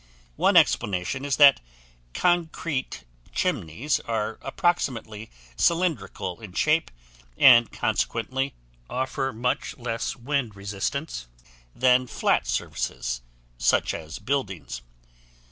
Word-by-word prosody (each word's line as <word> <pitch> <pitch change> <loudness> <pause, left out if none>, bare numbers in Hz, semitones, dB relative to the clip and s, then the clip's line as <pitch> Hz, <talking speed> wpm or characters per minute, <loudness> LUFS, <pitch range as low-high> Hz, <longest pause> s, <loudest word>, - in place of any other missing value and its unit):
One - - +4
explanation 100 +7 +2
is 140 -1 0
that 140 -2 +8 0.6
concrete 165 -5 0 0.3
chimneys 115 - 0
are 110 -1 -3
approximately 115 -11 -1 0.3
cylindrical 165 - 0
in 105 -5 -10
shape 155 - +2 0.5
and 120 -3 +7
consequently 130 +4 -1 0.3
offer 130 +1 -2
much 125 +1 -2
less 115 -2 -3
wind 125 -3 -2
resistance 100 - -4 0.5
than 125 0 +4
flat - - +1
surfaces - - -2 0.4
such - - +2
as 80 0 -7
buildings. 100 - -3
125 Hz, 95 wpm, -25 LUFS, 105-140 Hz, 0.6 s, that